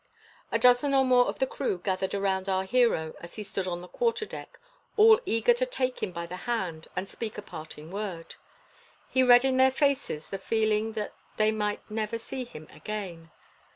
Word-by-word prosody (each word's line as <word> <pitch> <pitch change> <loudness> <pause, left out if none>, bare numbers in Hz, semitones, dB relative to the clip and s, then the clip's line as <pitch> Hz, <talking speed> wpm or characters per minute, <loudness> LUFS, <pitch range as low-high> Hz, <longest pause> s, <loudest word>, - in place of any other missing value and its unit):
A - - +3
dozen 250 +3 +4
or 265 -1 +5
more 250 -1 +5
of - - -3
the 265 - +2
crew 260 -6 -2
gathered 190 +1 -2
around 195 -1 0
our 190 0 +1
hero 190 -8 +2
as 170 - -10
he 215 - -5
stood 195 -2 -3
on 175 -1 -3
the 180 - -10
quarterdeck, 460 - -3 0.4
all 440 0 +8
eager 230 - +4
to 485 +1 -1
take 255 - -2
him - - -2
by 170 -1 -5
the 180 +2 -7
hand 180 -9 -2
and 185 +2 -2
speak 220 +2 -6
a - - -4
parting 155 -2 -9
word. 195 -5 -5 0.8
He 260 - +3
read 245 0 +7
in 260 -1 +2
their 260 0 +6
faces 275 - 0
the 195 - -3
feeling 220 +1 +1
that 215 -2 -4 0.2
they 215 0 +4
might 210 -1 -1
never 215 +1 -2
see 255 +3 -6
him 155 -10 -11
again. 175 -2 -6
215 Hz, 190 wpm, -28 LUFS, 185-255 Hz, 0.8 s, all